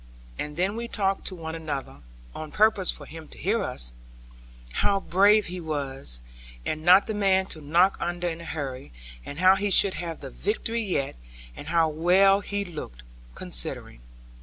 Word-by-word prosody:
And 150 +1 -4
then 190 +4 +1
we 235 +1 -4
talked 195 -4 0
to 185 - -4
one 160 -2 -6
another 155 -4 -5 0.4
(on 155 -1 -7
purpose 215 -2 +3
for 145 - -1
him 160 +1 -10
to - - -13
hear 210 +5 0
us), - - -4 0.8
how 195 - +2
brave 200 +3 +4
he 180 +1 -5
was, 135 - -3 0.4
and 155 0 -3
not 185 +4 +7
the 220 - -3
man 195 -2 +2
to 155 - -11
knock 170 +6 +3
under 175 +1 -2
in 165 -1 -4
a - - -9
hurry, 135 -5 -5 0.3
and 145 - -8
how 185 +2 +6
he 205 +1 -1
should 195 0 +5
have 165 -1 -5
the 135 - -8
victory 225 +3 -1
yet; 160 - -2 0.4
and - - -9
how 165 -1 +3
well 180 +5 +4
he 205 0 -3
looked, 150 - -8 0.3
considering. - - -4
175 Hz, 175 wpm, -26 LUFS, 150-195 Hz, 0.8 s, not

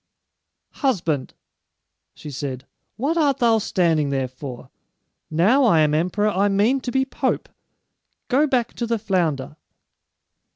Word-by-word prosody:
"Husband," 165 - 0 0.8
she 150 - -9
said, 130 -1 -5 0.3
"what 290 +8 0
art 285 -5 +2
thou 230 -2 +3
standing 165 -7 +1
there 135 -2 -1
for? 130 -1 -9 0.6
Now 195 - +3
I 170 -9 +5
am 150 -1 +2
emperor, 185 +7 +1
I 200 0 +1
mean 215 +7 +2
to 250 - -4
be 265 +1 +1
pope! 265 - -2 0.8
Go 285 +4 +3
back 250 -4 0
to 235 - -2
the 230 0 0
flounder." 170 -9 -1
195 Hz, 130 wpm, -22 LUFS, 150-245 Hz, 0.8 s, I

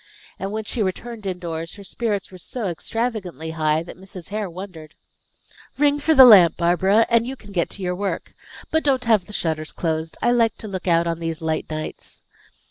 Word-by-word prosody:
And 195 +1 -3
when 220 +1 -3
she 220 +2 -3
returned 215 +2 -3
indoors, 170 -3 -4
her 200 - -11
spirits 205 -1 -3
were 185 - -11
so 235 +5 -5
extravagantly 185 - -3
high 155 0 +1
that 175 - -11
Mrs. 185 -2 -10
Hare 210 -1 -3
wondered. 170 -3 -9 0.8
"Ring 290 0 +3
for 315 +2 +2
the 265 -2 +11
lamp, 195 -8 +8
Barbara, 190 +6 +3
and 230 0 +3
you 265 - -4
can 210 -5 -14
get 175 -4 0
to 195 - -7
your 180 0 0
work. 195 +2 -3 0.4
But 320 - +2
don't 265 -3 +1
have 215 -6 +3
the - - -10
shutters 155 -4 -2
closed; 160 -1 -3
I 240 - +2
like 230 -2 +2
to 220 - -7
look 190 -2 -5
out 170 -1 +3
on 165 -1 -2
these 165 -1 -3
light 160 -1 -2
nights." 155 0 -6
190 Hz, 200 wpm, -22 LUFS, 165-225 Hz, 0.8 s, the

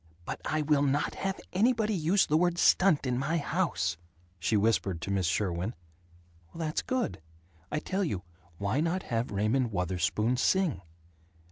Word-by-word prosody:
"But - - -5
I 155 0 0
will 150 -1 +3
not 145 +1 +1
have 195 0 -3
anybody 220 +2 +2
use 180 +2 +3
the 150 - +1
word 175 +1 +2
'stunt' 175 -5 +4
in 125 -1 0
my 155 +5 0
house," 140 - -1 0.4
she 105 +6 +1
whispered 100 -4 +1
to 95 - -3
Miss 95 -3 +1
Sherwin. 90 +4 -1 0.8
"That's 160 -2 -1
good. 255 - -2 0.5
I - - 0
tell 190 +6 -1
you: 100 - -2 0.3
why 100 +8 0
not 170 +4 0
have 115 +1 -2
Raymond 110 +5 +1
Wutherspoon 95 +6 0
sing?" 185 - +2
140 Hz, 150 wpm, -29 LUFS, -, 0.8 s, stunt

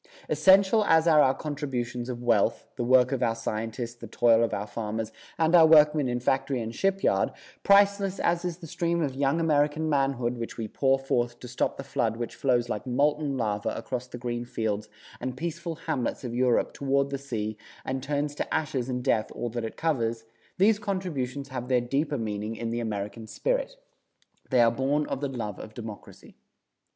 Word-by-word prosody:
Essential 190 +7 +5
as 160 -2 +4
are 155 -2 +6
our 130 -2 +4
contributions 130 -5 -4
of 120 -1 -5
wealth, 115 -4 +2
the - - -2
work 125 +1 +4
of 135 -2 -1
our 115 -2 +1
scientists, 115 +1 -4
the 120 -1 -10
toil 115 +1 +4
of 115 - 0
our 100 - -2
farmers 110 0 -4 0.3
and 160 0 +2
our 165 -2 +8
workmen 150 -2 +6
in 120 0 -1
factory 130 +1 0
and 115 0 -4
shipyard, 195 +7 +1 0.3
priceless 200 -1 +4
as 170 0 +1
is 175 -2 -3
the 180 - -10
stream 170 +1 -1
of 140 -3 -2
young 140 +4 +1
American 155 -1 +2
manhood 135 -4 0
which 115 - -5
we 115 -2 -3
pour 135 +4 +2
forth 120 -3 -1
to 125 - -9
stop 125 - -1
the 135 - -5
flood 115 -4 -1
which 120 -1 -4
flows 120 0 +1
like 105 0 -4
moulten 145 +2 +1
lava 105 -4 -1
across 125 -1 -4
the 125 - -8
green 120 0 -3
fields 110 -3 -3 0.3
and 130 0 -4
peaceful 170 +1 -4
hamlets 135 -7 -2
of 120 -2 -4
Europe 125 -1 +2
toward 140 0 0
the 140 - -2
sea 110 -6 -4 0.3
and 130 0 -2
turns 145 +1 -2
to - - -4
ashes 135 -5 -1
and 125 -1 -2
death 115 -5 +1
all 120 - -3
that 120 0 -3
it 110 - -6
covers, 115 -8 -1 0.3
these 210 +3 +4
contributions 150 -10 -3
have 125 -2 -5
their 125 -1 +3
deeper 140 +4 -1
meaning 105 -1 -3
in 115 0 -4
the 120 - -1
American 110 0 -4
spirit. - - -1 0.7
They 125 -3 +4
are 115 -1 +5
born 140 +5 0
of 135 - -4
the 140 - -1
love 115 -7 -5
of 110 - -10
Democracy. 110 -3 -10
130 Hz, 190 wpm, -27 LUFS, 115-150 Hz, 0.7 s, our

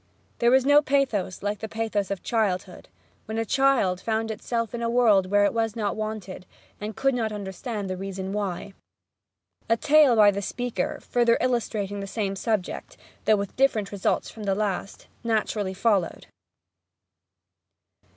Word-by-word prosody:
There 235 - +4
was 260 +1 +4
no 290 +1 +6
pathos 260 -11 0
like 205 0 -2
the 220 - -6
pathos 215 -3 -2
of 200 -2 -4
childhood, 200 -5 -1 0.4
when 220 +1 -4
a 225 - 0
child 235 -8 +2
found 225 +1 -1
itself 230 +2 -3
in 235 - -4
a 230 - 0
world 220 -6 +4
where 205 0 +4
it - - +1
was 225 -2 0
not 210 -3 -1
wanted, 215 -4 -5 0.3
and 210 0 -5
could 270 0 +1
not 225 -3 -1
understand 205 +1 -5
the 185 - -3
reason 190 0 -5
why. 200 -1 -3 1.0
A 230 - +4
tale 300 -2 +5
by 210 -2 +7
the 200 0 -3
speaker, 235 -2 -3
further 235 -1 +2
illustrating 215 -5 -1
the 200 - -5
same 195 -1 -2
subject, 210 -2 -3 0.3
though 215 - +5
with 200 -1 -4
different 230 -7 +2
results 200 -2 0
from 215 -2 -8
the 195 -1 +1
last, 200 -1 -3 0.2
naturally 215 -4 -1
followed. 195 -3 0
215 Hz, 160 wpm, -25 LUFS, 195-235 Hz, 1.0 s, by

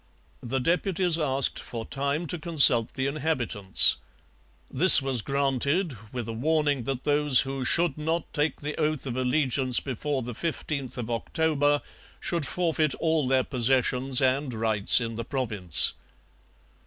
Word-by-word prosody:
The 125 +2 -4
deputies 175 +3 0
asked 135 -3 0
for 115 -2 -8
time 140 +5 -4
to 170 +1 -5
consult 140 -8 +3
the 130 - -3
inhabitants. 135 -9 +1 0.7
This 175 +7 +10
was 135 -4 -3
granted, 140 - -2 0.2
with 120 -3 -6
a 115 - -6
warning 145 0 -1
that 135 -1 -5
those 145 -2 +3
who 135 -1 -5
'should 170 +1 +1
not 160 +2 -4
take 150 +1 -2
the 150 +1 -5
oath 155 -3 -2
of 125 -3 -5
allegiance 130 -1 +1
before 135 +1 -4
the 120 +1 -7
15th 145 -2 -5
of 120 -1 -6
October 145 +3 -1 0.4
should 165 -5 -3
forfeit 160 -2 -1
all 160 -4 -1
their 130 0 +1
possessions 130 +1 0
and 130 -1 -1
rights 110 -1 +4
in 115 -2 -6
the 115 - -4
Province.' 110 - +1
135 Hz, 140 wpm, -25 LUFS, 125-155 Hz, 0.7 s, This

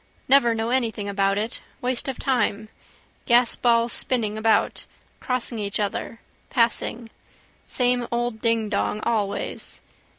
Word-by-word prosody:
Never 245 -4 +5
know 225 +1 -2
anything 230 -5 0
about 195 0 +1
it. 220 +2 -3 0.2
Waste 250 +1 +1
of 265 - -3
time. 220 -5 0 0.6
Gasballs 235 -1 +3
spinning 220 -5 0
about, 220 0 +1 0.3
crossing 250 -2 -2
each 200 0 -3
other, 210 +2 -3 0.3
passing. 230 -1 0 0.6
Same 245 -1 +1
old 240 -2 -2
dingdong 220 -2 0
always. 205 -3 -2
230 Hz, 110 wpm, -24 LUFS, 215-245 Hz, 0.6 s, Never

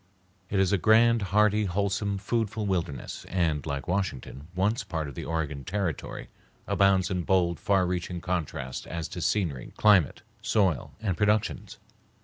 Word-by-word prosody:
It 100 - 0
is 95 0 +3
a 100 - +3
grand, 115 +3 +5
hearty, 105 +1 +3
wholesome, 100 +1 -1
foodful 110 +1 -1
wilderness 85 -8 -3
and, 80 -5 0
like 70 -2 -3
Washington, 80 -6 -3
once 105 +7 +1
a - - -10
part 80 -3 -3
of 70 - -7
the - - -6
Oregon 75 -4 -3
Territory, 90 0 -3 0.4
abounds 95 -2 +3
in 90 -1 0
bold, 85 -2 +1
far 95 0 +2
reaching 90 0 -3
contrasts 80 -7 -3
as 85 -1 -4
to 90 - -6
scenery, 80 - -1
climate, 100 -9 +4 0.2
soil, 95 - +1
and 100 -5 -1
productions. 105 +3 0
95 Hz, 150 wpm, -27 LUFS, 80-100 Hz, 0.4 s, grand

